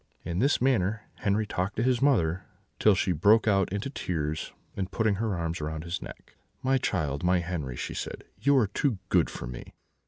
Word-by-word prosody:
"In 85 Hz, +1 st, -2 dB
this 140 Hz, +4 st, +3 dB
manner 110 Hz, -5 st, +1 dB, 0.2 s
Henri 105 Hz, +2 st, +1 dB
talked 100 Hz, 0 st, -2 dB
to 115 Hz, -, 0 dB
his 125 Hz, -1 st, +2 dB
mother, 95 Hz, -, +2 dB, 0.3 s
till 105 Hz, -2 st, +5 dB
she 95 Hz, 0 st, +1 dB
broke 105 Hz, +8 st, +4 dB
out 95 Hz, -4 st, +3 dB
into 100 Hz, +5 st, -2 dB
tears, 80 Hz, -, -3 dB, 0.2 s
and 95 Hz, -2 st, -2 dB
putting 110 Hz, -2 st, +1 dB
her 110 Hz, -5 st, 0 dB
arms 85 Hz, 0 st, -2 dB
round 75 Hz, +1 st, -3 dB
his 85 Hz, +2 st, -4 dB
neck: -, -, -11 dB, 0.3 s
"'My 135 Hz, 0 st, +3 dB
child, 75 Hz, -, -1 dB
my 90 Hz, 0 st, +3 dB
Henri,' 80 Hz, -8 st, -4 dB
she -, -, -4 dB
said, -, -, -5 dB, 0.2 s
'you 140 Hz, 0 st, +4 dB
are 125 Hz, -, +5 dB
too 110 Hz, +4 st, 0 dB
good 90 Hz, -3 st, +3 dB
for -, -, -6 dB
me!' -, -, -9 dB
95 Hz, 195 wpm, -28 LUFS, 85-110 Hz, 0.3 s, till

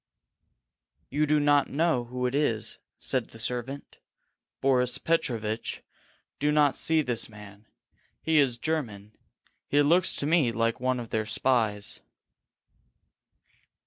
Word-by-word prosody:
"You 150 Hz, +1 st, +1 dB
do 150 Hz, 0 st, +3 dB
not 145 Hz, -1 st, +3 dB
know 150 Hz, -4 st, +1 dB
who 125 Hz, +1 st, -4 dB
it 125 Hz, -, -1 dB
is," 135 Hz, -7 st, 0 dB, 0.2 s
said 130 Hz, -3 st, -2 dB
the -, -, -14 dB
servant. 125 Hz, +4 st, -5 dB, 0.6 s
"Boris 125 Hz, -2 st, +2 dB
Petrovitch, 115 Hz, -9 st, -2 dB, 0.6 s
do 150 Hz, +1 st, +2 dB
not 150 Hz, -2 st, +3 dB
see 160 Hz, -1 st, +2 dB
this 120 Hz, -4 st, -2 dB
man. 105 Hz, 0 st, -14 dB, 0.6 s
He 160 Hz, -1 st, +3 dB
is 135 Hz, -4 st, +3 dB
a -, -, -21 dB
German. 115 Hz, -10 st, -3 dB, 0.6 s
He 145 Hz, +1 st, +3 dB
looks 170 Hz, +5 st, +3 dB
to -, -, -3 dB
me 150 Hz, -6 st, +3 dB
like 115 Hz, +1 st, 0 dB
one 130 Hz, 0 st, 0 dB
of 115 Hz, -2 st, -7 dB
their 110 Hz, -1 st, -1 dB
spies." 110 Hz, -3 st, 0 dB
125 Hz, 130 wpm, -27 LUFS, 115-145 Hz, 0.6 s, do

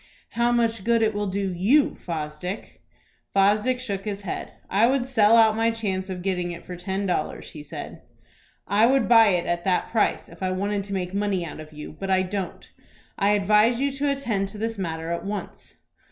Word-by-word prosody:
"How 235 Hz, +1 st, +1 dB
much 230 Hz, -3 st, +1 dB
good 230 Hz, +1 st, +3 dB
it 220 Hz, 0 st, +2 dB
will 205 Hz, 0 st, -2 dB
do 195 Hz, 0 st, -2 dB
you, 230 Hz, +12 st, +3 dB
Fosdick." 165 Hz, +4 st, -6 dB, 0.5 s
Fosdick 210 Hz, +6 st, +3 dB
shook 200 Hz, -6 st, -4 dB
his 205 Hz, -1 st, -4 dB
head. 185 Hz, -, -5 dB, 0.2 s
"I 210 Hz, +4 st, +3 dB
would 260 Hz, -1 st, +1 dB
sell 230 Hz, -3 st, +4 dB
out 220 Hz, -1 st, +5 dB
my 225 Hz, +1 st, +2 dB
chance 200 Hz, -4 st, -2 dB
of 180 Hz, -1 st, -5 dB
getting 180 Hz, -2 st, -1 dB
it 170 Hz, -, -9 dB
for 180 Hz, -, -7 dB
ten 190 Hz, +3 st, -3 dB
dollars," 175 Hz, -5 st, -2 dB
he 150 Hz, -, -9 dB
said. 145 Hz, -, -8 dB, 0.7 s
"I 210 Hz, +4 st, +4 dB
would 265 Hz, -1 st, +3 dB
buy 225 Hz, -2 st, +7 dB
it 180 Hz, -3 st, +1 dB
at 175 Hz, 0 st, -1 dB
that 185 Hz, -2 st, +1 dB
price 225 Hz, -, +1 dB
if -, -, -15 dB
I 185 Hz, -1 st, 0 dB
wanted 200 Hz, +1 st, -1 dB
to 200 Hz, -, -6 dB
make 180 Hz, -1 st, -3 dB
money 200 Hz, -3 st, 0 dB
out 155 Hz, -, -8 dB
of 155 Hz, 0 st, -10 dB
you; 150 Hz, 0 st, -9 dB
but 195 Hz, -, -4 dB
I 190 Hz, 0 st, +3 dB
don't. 190 Hz, 0 st, -5 dB, 0.5 s
I 200 Hz, +1 st, +3 dB
advise 210 Hz, +4 st, +3 dB
you 280 Hz, +1 st, +1 dB
to 280 Hz, +1 st, -1 dB
attend 225 Hz, -8 st, -1 dB
to 210 Hz, -, -9 dB
this 225 Hz, 0 st, -3 dB
matter 165 Hz, -2 st, -3 dB
at 170 Hz, -, -2 dB
once." 205 Hz, +1 st, -6 dB
200 Hz, 205 wpm, -25 LUFS, 185-225 Hz, 0.7 s, buy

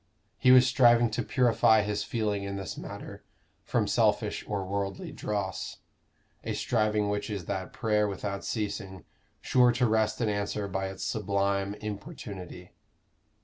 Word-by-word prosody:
He 125 Hz, -, +4 dB
was 130 Hz, 0 st, +8 dB
striving 120 Hz, -2 st, +5 dB
to 110 Hz, -, -1 dB
purify 115 Hz, -4 st, +3 dB
his 105 Hz, 0 st, -2 dB
feeling 105 Hz, -3 st, -1 dB
in 100 Hz, 0 st, -4 dB
this 95 Hz, -3 st, -5 dB
matter -, -, -8 dB, 0.4 s
from -, -, 0 dB
selfish -, -, +1 dB
or 100 Hz, -2 st, -2 dB
worldly 100 Hz, 0 st, -3 dB
dross 100 Hz, -3 st, -3 dB, 0.7 s
a -, -, -2 dB
striving 110 Hz, -2 st, +1 dB
which 105 Hz, +2 st, -2 dB
is 100 Hz, -5 st, -4 dB
that 95 Hz, +1 st, -4 dB
prayer 105 Hz, -2 st, +1 dB
without 100 Hz, 0 st, -4 dB
ceasing, 100 Hz, -4 st, -4 dB, 0.4 s
sure 125 Hz, -1 st, +4 dB
to 125 Hz, +1 st, +2 dB
wrest 110 Hz, -1 st, +1 dB
an 115 Hz, -, +1 dB
answer 100 Hz, 0 st, -2 dB
by 95 Hz, 0 st, -2 dB
its 95 Hz, 0 st, -7 dB
sublime 100 Hz, -1 st, 0 dB
importunity. 100 Hz, -4 st, -8 dB
105 Hz, 145 wpm, -29 LUFS, 100-110 Hz, 0.7 s, was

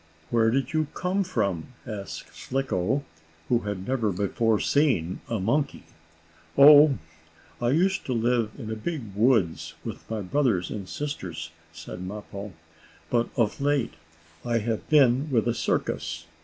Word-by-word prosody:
"Where 115 Hz, -1 st, +4 dB
did 135 Hz, +6 st, 0 dB
you 155 Hz, -1 st, +1 dB
come 190 Hz, +2 st, 0 dB
from?" 100 Hz, -, -2 dB
asked 105 Hz, -4 st, -7 dB
Slicko, 135 Hz, -1 st, -1 dB, 0.5 s
who 120 Hz, -, +4 dB
had 105 Hz, -3 st, -5 dB
never 120 Hz, -5 st, +1 dB
before 105 Hz, +3 st, +1 dB
seen 120 Hz, -, +1 dB
a 115 Hz, -2 st, -1 dB
monkey. 140 Hz, +9 st, 0 dB, 0.7 s
"Oh, 145 Hz, 0 st, +9 dB, 0.6 s
I 120 Hz, -, +2 dB
used 185 Hz, +8 st, +2 dB
to 130 Hz, -, 0 dB
live 115 Hz, -1 st, +1 dB
in 110 Hz, -5 st, -6 dB
a -, -, -2 dB
big 115 Hz, -, -5 dB
woods, 105 Hz, -5 st, +2 dB
with -, -, -7 dB
my 110 Hz, -1 st, -2 dB
brothers 105 Hz, -4 st, +1 dB
and 100 Hz, -4 st, -6 dB
sisters," 85 Hz, -, -5 dB, 0.2 s
said 90 Hz, +2 st, -8 dB
Mappo. 100 Hz, +1 st, -7 dB, 0.6 s
"But, 120 Hz, -1 st, +2 dB
of 115 Hz, +2 st, +1 dB
late, 140 Hz, -4 st, +1 dB, 0.5 s
I 120 Hz, -1 st, +1 dB
have 115 Hz, 0 st, -2 dB
been 140 Hz, -1 st, +4 dB
with 120 Hz, -4 st, +2 dB
a 120 Hz, -, +2 dB
circus. 80 Hz, -, -2 dB
115 Hz, 140 wpm, -26 LUFS, 100-140 Hz, 0.7 s, Oh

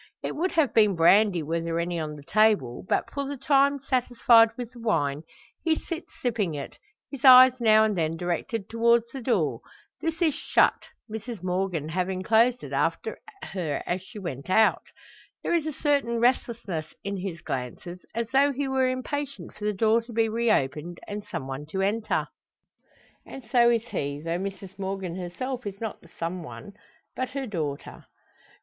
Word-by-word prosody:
It -, -, -3 dB
would 360 Hz, +5 st, -1 dB
have 315 Hz, -5 st, +2 dB
been 210 Hz, -4 st, +4 dB
brandy 180 Hz, +1 st, +4 dB
were 165 Hz, +2 st, -2 dB
there 165 Hz, 0 st, -2 dB
any 170 Hz, 0 st, -2 dB
on 155 Hz, -1 st, -4 dB
the 145 Hz, -, -12 dB
table; 205 Hz, -, +2 dB
but, -, -, 0 dB
for 280 Hz, 0 st, -3 dB
the 285 Hz, 0 st, -5 dB
time 280 Hz, +1 st, +3 dB
satisfied 245 Hz, -3 st, +4 dB
with 245 Hz, -2 st, -6 dB
the 245 Hz, -, -13 dB
wine, 145 Hz, -11 st, 0 dB, 0.4 s
he 325 Hz, -2 st, +3 dB
sits 335 Hz, +1 st, -6 dB
sipping 215 Hz, -10 st, 0 dB
it, 140 Hz, -, -7 dB, 0.3 s
his 275 Hz, -3 st, -8 dB
eyes 255 Hz, -1 st, +9 dB
now 220 Hz, -1 st, +6 dB
and 215 Hz, -2 st, +1 dB
then 165 Hz, -1 st, -1 dB
directed 180 Hz, +5 st, -3 dB
towards 235 Hz, +1 st, +2 dB
the 270 Hz, -, -5 dB
door. 245 Hz, +1 st, 0 dB, 0.4 s
This 325 Hz, 0 st, -2 dB
is 325 Hz, -4 st, +3 dB
shut, 300 Hz, -, +2 dB, 0.2 s
Mrs 220 Hz, -2 st, -7 dB
Morgan 180 Hz, -4 st, -1 dB
having 185 Hz, +2 st, -2 dB
closed 235 Hz, +4 st, +3 dB
it -, -, -7 dB
after -, -, -1 dB, 0.2 s
her 165 Hz, -7 st, -3 dB
as 180 Hz, +1 st, -2 dB
she 200 Hz, +4 st, -13 dB
went 170 Hz, -7 st, -6 dB
out. 220 Hz, +3 st, +4 dB, 0.6 s
There -, -, 0 dB
is 325 Hz, -2 st, +1 dB
a -, -, -1 dB
certain 280 Hz, -6 st, 0 dB
restlessness 230 Hz, -9 st, -1 dB
in 200 Hz, 0 st, -3 dB
his 180 Hz, -3 st, -5 dB
glances, 135 Hz, +8 st, -5 dB, 0.2 s
as 230 Hz, 0 st, -1 dB
though 275 Hz, +2 st, +4 dB
he 280 Hz, +1 st, -2 dB
were 265 Hz, -1 st, +2 dB
impatient 275 Hz, +2 st, -4 dB
for 210 Hz, -, -7 dB
the 210 Hz, -, +2 dB
door 220 Hz, +3 st, +2 dB
to 235 Hz, +1 st, -12 dB
be 225 Hz, 0 st, +2 dB
reopened, 175 Hz, -, 0 dB
and 205 Hz, 0 st, -5 dB
some 165 Hz, -10 st, -5 dB
one 135 Hz, +2 st, -6 dB
to 190 Hz, +4 st, -2 dB
enter. 210 Hz, +3 st, 0 dB, 1.0 s
And 260 Hz, -4 st, -11 dB
so 240 Hz, -1 st, +5 dB
is 235 Hz, 0 st, 0 dB
he, 140 Hz, 0 st, -3 dB
though 165 Hz, +3 st, -3 dB
Mrs 195 Hz, 0 st, -7 dB
Morgan 190 Hz, -2 st, -4 dB
herself 235 Hz, +7 st, -5 dB
is 200 Hz, 0 st, -6 dB
not 225 Hz, -2 st, -5 dB
the 170 Hz, -, -18 dB
some 170 Hz, +2 st, -3 dB
one 200 Hz, +5 st, -10 dB, 0.4 s
but 255 Hz, 0 st, -2 dB
her 270 Hz, 0 st, -4 dB
daughter. 155 Hz, -, -5 dB
215 Hz, 180 wpm, -26 LUFS, 175-250 Hz, 1.0 s, eyes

